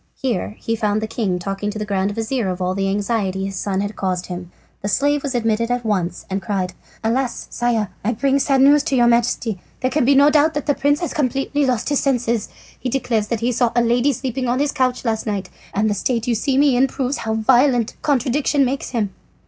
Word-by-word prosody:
Here 230 -5 -2
he 225 - -2
found 210 -1 0
the 220 - -2
king 215 -5 -1
talking 195 +3 -3
to 210 - -5
the 210 - -3
grand 195 -1 0
vizir 225 0 -1
of 180 0 -3
all 185 0 0
the 195 0 -1
anxiety 200 -2 -1
his 195 0 -5
son 190 +1 -1
had 205 +1 -4
caused 185 -2 -2
him. 175 -1 -7 0.3
The 200 - -3
slave 285 +8 +2
was 275 -3 -3
admitted 230 0 +1
at 245 -1 -1
once 185 -5 -1
and 195 +1 -2
cried: 185 -1 -2 0.3
"Alas, 240 +2 -1
Sire! 235 -4 0
I 220 - +1
bring 275 +4 +1
sad 275 -1 +2
news 285 +2 +6
to 270 - 0
your 240 -2 +4
Majesty. 235 -3 +1 0.2
There 255 0 0
can 300 +1 +2
be 275 +3 +4
no 285 +2 +6
doubt 305 +1 +3
that 295 - -2
the 290 - +2
prince 290 +3 +1
has 345 - -2
completely 275 +1 0
lost 245 -1 0
his 285 - +2
senses. 235 -5 0 0.3
He 255 - -3
declares 235 -5 0
that 235 -1 -2
he 240 +2 +1
saw 240 -1 +1
a 240 - +4
lady 240 +4 +3
sleeping 260 0 -3
on 245 +1 +1
his 285 +1 +1
couch 255 -3 0
last 220 -1 -1
night, 200 -2 -3 0.2
and 210 +2 +1
the 210 - +1
state 230 +3 -1
you 245 - +1
see 260 +4 0
me 280 -2 +4
in 260 +2 +4
proves 265 +1 -2
how 220 0 -2
violent 245 +1 +3
contradiction 275 +1 +2
makes 270 +2 -2
him." 215 -6 -2
235 Hz, 230 wpm, -20 LUFS, 210-270 Hz, 0.3 s, news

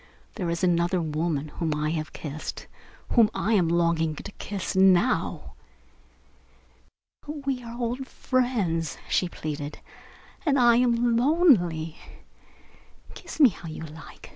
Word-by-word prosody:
"There 180 -5 -3
is 170 +2 -2
another 175 +1 +2
woman 155 -2 -2
whom 155 0 -2
I 150 +1 -1
have 155 -1 -3
kissed 155 0 -6 0.5
whom 230 -4 +6
I 220 - 0
am 185 -6 +3
longing 170 -2 +1
to - - -8
kiss 200 -1 -4
now." 190 +5 +3 1.7
"But 295 -1 -8
we 265 -2 -1
are 235 0 -8
old 245 +2 -2
friends," 210 - -1
she 180 - +1
pleaded, 150 -3 -5 0.7
"and 285 -4 +2
I 240 -2 +5
am 240 -1 +2
lonely. 220 - +3 1.2
Kiss 340 -3 -10
me 280 -5 +8
how 175 -4 -10
you 155 - -7
like. 160 0 -11
180 Hz, 130 wpm, -26 LUFS, 160-245 Hz, 1.7 s, me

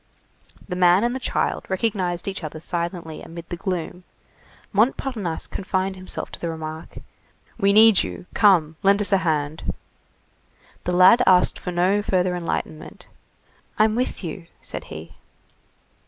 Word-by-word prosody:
The 180 - -4
man 180 +2 +4
and 240 +1 0
the - - -3
child 255 - -1
recognized 190 -3 -1
each 190 -2 -4
other 155 0 -6
silently 170 -1 -4
amid 170 0 -10
the 175 - -3
gloom: 180 -1 -4 0.7
Montparnasse 215 -4 0
confined 190 0 -2
himself 185 0 -6
to - - -8
the 170 - -3
remark:— 160 0 -7 0.6
"We 195 0 +4
need 215 0 +7
you. - - -6
Come, 165 -7 +4
lend 200 +1 +4
us 205 - +1
a - - +6
hand." 155 -4 -2 1.1
The 180 - 0
lad 190 +7 +7
asked 180 -1 +4
for 180 - -5
no 185 +4 +2
further 180 -3 0
enlightenment. 165 -2 -5 0.7
"I'm 215 0 +4
with 245 -2 -2
you," 170 +1 -6
said - - -8
he. 80 +2 -10
180 Hz, 140 wpm, -23 LUFS, 170-200 Hz, 1.1 s, need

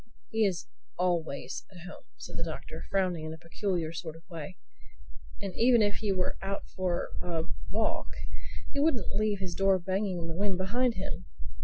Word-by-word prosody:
"He 220 -1 +5
is 180 -3 -1 0.3
always 170 -5 +1
at 180 -3 -10
home," - - -9
said - - -7
the 170 - -1
Doctor 160 0 -5
frowning 185 -5 +2
in 155 0 -3
a - - -12
peculiar 170 0 -1
sort 165 -1 -4
of 165 - -15
way. 165 +2 -5 0.8
"And 195 -2 -3
even 235 -1 +7
if 205 -1 +2
he 210 -3 +1
were 185 -1 +1
out 195 +1 -2
for 180 -2 0
a 165 -2 0 0.3
walk - - +1 0.7
he 285 - 0
wouldn't 280 -8 +3
leave 210 0 +3
his 190 -2 -3
door 195 +1 +5
banging 190 +1 0
in 170 - -2
the 165 - -2
wind 195 0 +2
behind 235 +6 +2
him. 185 -1 -3
185 Hz, 180 wpm, -31 LUFS, 170-200 Hz, 0.8 s, even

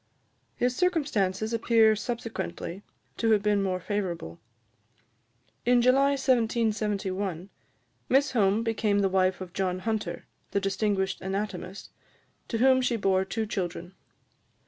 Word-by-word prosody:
His 245 0 0
circumstances 235 - 0
appear 225 -1 +4
subsequently 205 -5 -5 0.4
to 225 - +1
have 205 -2 +2
been 205 -1 +2
more 185 -2 -1
favourable. 175 - -4 1.2
In 245 0 +4
July 270 +3 +4
1771, 210 - 0 0.6
Miss 275 +3 +3
Home 210 -2 +2
became 215 -3 +1
the 195 - +2
wife 185 0 +1
of 180 -1 -7
John 185 -1 -1
Hunter, 220 +3 -3 0.2
the 200 - 0
distinguished 195 0 -1
anatomist, 195 -1 -5 0.6
to 230 - -2
whom 260 +2 +4
she 250 -1 +1
bore 190 -3 +2
two 220 +3 -3
children. 180 -3 -4
210 Hz, 120 wpm, -27 LUFS, 190-230 Hz, 1.2 s, appear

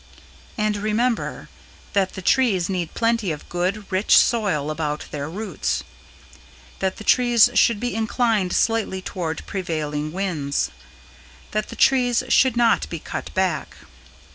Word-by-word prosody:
AND 215 -1 0
REMEMBER: 220 +3 -1 0.5
That 195 -2 +1
the 190 - -7
trees 200 -7 +2
need 180 -4 -3
plenty 230 -5 +1
of 150 - -7
good, 185 +4 -2
rich 190 +3 +4
soil 180 -11 +2
about 150 -1 -3
their 145 0 -4
roots. 210 +6 -3 1.0
That 190 -1 -1
the - - -8
trees 240 0 +5
should 235 -2 +3
be 245 +2 -2
inclined 220 -3 0
slightly 220 -4 0
toward 165 -5 -4
prevailing 155 -5 -3
winds. 165 -7 -2 0.8
That 215 0 -2
the - - -8
trees 250 -2 +3
should 255 -1 +4
not 235 -1 +3
be 170 - -4
cut - - -6
back. 185 -4 -1
195 Hz, 135 wpm, -22 LUFS, 170-230 Hz, 1.0 s, trees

